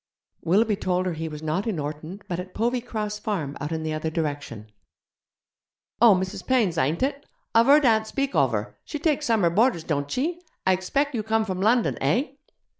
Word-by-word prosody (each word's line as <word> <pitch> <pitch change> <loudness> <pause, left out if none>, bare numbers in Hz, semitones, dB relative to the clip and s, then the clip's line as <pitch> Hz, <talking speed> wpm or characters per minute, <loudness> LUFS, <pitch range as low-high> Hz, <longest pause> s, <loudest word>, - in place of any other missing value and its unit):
Willoughby 205 +5 +2
told 185 -2 0
her 180 - -1
he 160 0 -4
was 150 0 -8
not 160 +8 -1
in 210 -6 -1
Orton, 155 +6 -5
but 175 -1 -3
at 180 0 -8
Povey 240 +2 0
Cross 210 -3 -4
Farm 160 -11 -3
out 145 +2 -3
in 160 -1 -2
the 155 0 -2
other 155 +1 -2
direction. 145 -9 -4 1.3
'Oh, 230 -4 +8
Mrs. 185 0 -3
Payne's, 230 -10 +2
ain't 155 - 0
it? 280 +1 -1 0.3
I've 230 +2 +5
heard 290 +1 +6
aunt 220 -2 +3
speak 275 +3 -2
ovver. - - +1
She 300 - -5
takes 300 -1 0
summer 210 -7 +3
boarders, 215 -2 +2
don't 145 -3 -1
chee? 325 - -2 0.2
I 190 0 +4
egspeck 275 +10 -1
you 230 - -1
come 220 +1 +1
from 185 -2 -3
London, 230 +3 +2
heh?' 255 +3 +1
195 Hz, 190 wpm, -25 LUFS, 160-235 Hz, 1.3 s, Oh